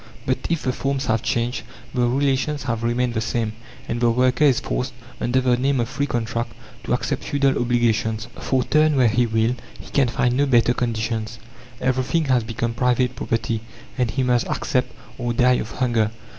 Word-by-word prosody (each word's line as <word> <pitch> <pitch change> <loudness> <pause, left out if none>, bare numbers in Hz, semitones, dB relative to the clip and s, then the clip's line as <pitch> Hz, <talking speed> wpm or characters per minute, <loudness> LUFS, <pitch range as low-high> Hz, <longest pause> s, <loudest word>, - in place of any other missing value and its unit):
But 130 - +1
if 165 -2 0
the 130 - 0
forms 135 +1 -1
have 110 -1 +1
changed, 120 +1 -1 0.3
the 125 -1 +2
relations 140 +3 0
have 115 -3 -2
remained 120 +1 0
the 110 - -1
same, 110 -1 -1 0.3
and 120 +1 -2
the 120 - +4
worker 125 +5 +3
is 135 -4 +4
forced, 125 +1 -3 0.3
under 125 +2 +1
the 125 -1 +3
name 135 +1 +1
of 120 0 -1
free 140 +1 -1
contract, 115 -1 -2 0.3
to - - 0
accept - - -1
feudal 140 -1 +1
obligations. 115 -2 +1
For, 130 -1 +1
turn 155 +2 +3
where 130 -3 +5
he 120 +2 +2
will, 110 +2 +1 0.2
he - - -12
can 140 -3 +3
find 120 +1 +1
no 140 +2 +2
better 120 -2 +4
conditions. 115 -2 -2 0.4
Everything 130 +5 +1
has 130 -4 +2
become 115 +1 -2
private 125 +1 +1
property, 115 -1 -1 0.3
and 125 -2 0
he 130 +4 0
must 125 -2 +2
accept, 130 -5 -1 0.3
or 120 -1 -1
die 125 +1 +4
of 110 - -6
hunger. 115 -2 +1
125 Hz, 185 wpm, -22 LUFS, 115-130 Hz, 0.4 s, where